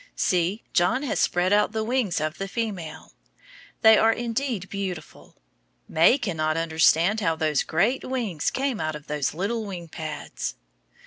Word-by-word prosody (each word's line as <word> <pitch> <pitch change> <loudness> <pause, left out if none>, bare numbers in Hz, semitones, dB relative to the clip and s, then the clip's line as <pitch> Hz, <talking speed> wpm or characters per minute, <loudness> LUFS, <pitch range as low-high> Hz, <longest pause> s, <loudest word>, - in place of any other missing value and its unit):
See! 180 +4 0
John 180 +10 +2
has 280 - -1
spread 180 +2 +2
out 210 +1 +3
the 220 0 -1
wings 230 -7 0
of 155 +1 -3
the 195 - -3
female. 195 -7 -5 0.7
They 220 -1 +8
are 225 - +5
indeed 235 -3 -2
beautiful. 190 -6 -6 0.5
May 165 - +5
cannot 160 - -1
understand 165 +5 +3
how 165 -6 +1
those 155 -3 +1
great 200 +11 +1
wings 230 - -2
came 265 -4 -2
out 155 0 -2
of 150 -1 -9
those 150 -1 -2
little 215 +6 -2
wing 180 -5 -7
pads. 155 -1 -5
190 Hz, 150 wpm, -25 LUFS, 160-225 Hz, 0.7 s, They